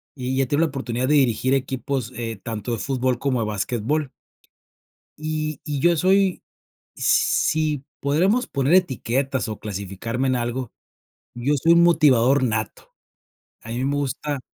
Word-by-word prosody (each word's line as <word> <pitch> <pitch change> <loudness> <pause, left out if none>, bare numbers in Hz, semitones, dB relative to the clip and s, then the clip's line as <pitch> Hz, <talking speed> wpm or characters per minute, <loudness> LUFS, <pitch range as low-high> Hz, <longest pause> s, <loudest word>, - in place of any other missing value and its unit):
y 130 0 -1
he 135 - 0
tenido 145 +4 +1
la - - -2
oportunidad 130 -2 -3
de 150 - +3
dirigir 130 -2 +2
equipos 130 -2 -2
eh, 115 -3 -5
tanto 110 -1 -4
de 115 - -2
fútbol 130 +3 -1
como 130 -2 0
de - - -1
basquetbol. 120 - -2 1.1
Y 155 -1 -3
y 145 -2 -3
yo 175 +4 +4
soy, 190 +2 +2 0.5
s - - -5 0.4
si 155 -3 0 0.2
podremos 185 - +2
poner 140 +3 0
etiquetas, 135 -6 0
o 110 -1 -5
clasificarme 105 +5 -4
en 130 - +1
algo, 120 0 -3 0.6
yo 120 +5 0
soy 165 +2 +5
motivador 145 -6 +4
nato. 110 -3 -3 0.7
A 115 - -10
mí 120 +2 -2
me 140 +1 0
gusta 145 +1 -2
130 Hz, 150 wpm, -23 LUFS, 120-150 Hz, 1.1 s, soy